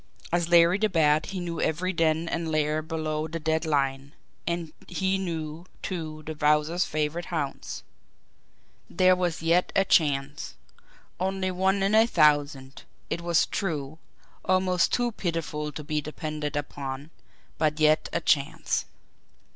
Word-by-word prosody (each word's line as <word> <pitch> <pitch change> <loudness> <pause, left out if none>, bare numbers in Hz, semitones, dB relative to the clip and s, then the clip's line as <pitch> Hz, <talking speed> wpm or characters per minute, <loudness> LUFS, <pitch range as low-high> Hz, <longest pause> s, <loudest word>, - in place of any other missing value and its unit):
As 170 0 +1
Larry 170 +2 +6
the 215 0 +2
Bat 155 -3 +3
he 195 - -4
knew 170 -2 -3
every 180 +4 0
den 165 -1 +1
and 165 -1 -2
lair 155 0 +1
below 155 -1 -3
the 165 +1 -5
dead 160 +1 0
line, 140 -2 0 0.3
and 170 -2 -2
he 190 +1 0
knew, 165 -2 -4 0.2
too, 155 -4 -5
the 155 - -4
Wowzer's 150 +3 +2
favourite 155 +3 -2
haunts. 150 -5 -4 1.1
There 185 +1 +4
was 175 -3 -2
yet 170 +2 +3
a 195 - +4
chance, 145 -4 +1 0.6
only 190 0 -1
one 190 +2 +1
in 195 +2 +1
a 220 +1 +6
thousand, 145 - +2 0.3
it 170 - -1
was 170 -1 +3
true, 155 -5 -3 0.4
almost 185 -1 +2
too 245 -1 +1
pitiful 165 -6 -3
to 150 +1 -7
be 150 0 -1
depended 155 -1 -4
upon 145 0 -5 0.5
but 155 0 +1
yet 155 0 +3
a 170 - -1
chance. 140 -3 +1
160 Hz, 140 wpm, -27 LUFS, 150-175 Hz, 1.1 s, Larry